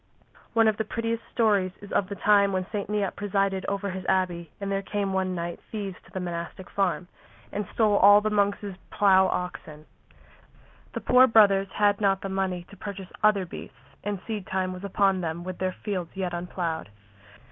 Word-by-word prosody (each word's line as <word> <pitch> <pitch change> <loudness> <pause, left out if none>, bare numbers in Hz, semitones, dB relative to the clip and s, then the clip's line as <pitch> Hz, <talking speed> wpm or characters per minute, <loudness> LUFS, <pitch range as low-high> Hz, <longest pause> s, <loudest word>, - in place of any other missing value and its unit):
One 225 -1 +5
of 215 -1 +2
the 220 - 0
prettiest 230 +1 -2
stories 205 -6 +2
is 205 - -12
of 190 - +1
the 200 - -4
time 200 0 +4
when 185 -1 -1
St. 205 -2 -3
Neot 205 -3 -1
presided 195 -1 0
over 200 0 -2
his 185 0 -5
abbey 175 -4 0
and 200 -1 -3
there 195 0 0
came 200 -1 -2
one 190 -1 0
night 170 0 -4
thieves 200 -4 -4
to - - -19
the 190 - -4
monastic 175 +1 -6
farm 185 -2 0 0.4
and 205 -1 -3
stole 215 -3 +3
all 205 +1 +8
the 215 +1 -1
monks' 205 0 +1 0.2
plough 190 -2 +5
oxen. 155 -4 -5 1.1
The - - -4
poor 255 +1 +6
brothers 200 -4 +5
had 205 0 +2
not 195 -1 +2
the 195 - -4
money 190 -2 -1
to - - -11
purchase 195 -1 -7
other 210 -3 +4
beasts, 135 -5 -10 0.3
and 205 -1 -2
seed 215 -4 -4
time 185 -1 -1
was 180 +1 -9
upon 195 -1 +2
them 170 0 -3
with 185 0 -6
their 185 -1 -1
fields 185 -5 -2
yet 185 -2 -2
unploughed. 175 - -3
195 Hz, 190 wpm, -26 LUFS, 185-205 Hz, 1.1 s, all